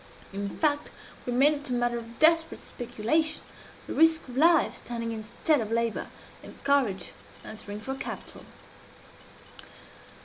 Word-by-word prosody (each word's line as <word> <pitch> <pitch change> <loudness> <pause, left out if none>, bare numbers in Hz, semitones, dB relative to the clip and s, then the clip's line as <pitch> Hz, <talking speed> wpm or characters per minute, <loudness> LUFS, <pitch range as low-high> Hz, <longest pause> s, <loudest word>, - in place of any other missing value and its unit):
In 200 0 -3
fact, 295 -2 +1 0.4
we - - 0
made 275 +5 +5
it 290 -1 -5
a - - -1
matter 240 -1 +1
of 230 0 -11
desperate 325 +1 +4
speculation 295 +7 -1 0.4
the - - -5
risk 325 -1 +4
of 250 - -9
life 325 +3 +4
standing 230 -1 -4
instead 225 +6 0
of 220 -1 -4
labor, 230 -1 0 0.3
and - - -11
courage 260 -10 +1 0.3
answering 210 -1 -7
for 265 +4 -4
capital. 270 - -6
245 Hz, 135 wpm, -28 LUFS, 230-305 Hz, 0.4 s, made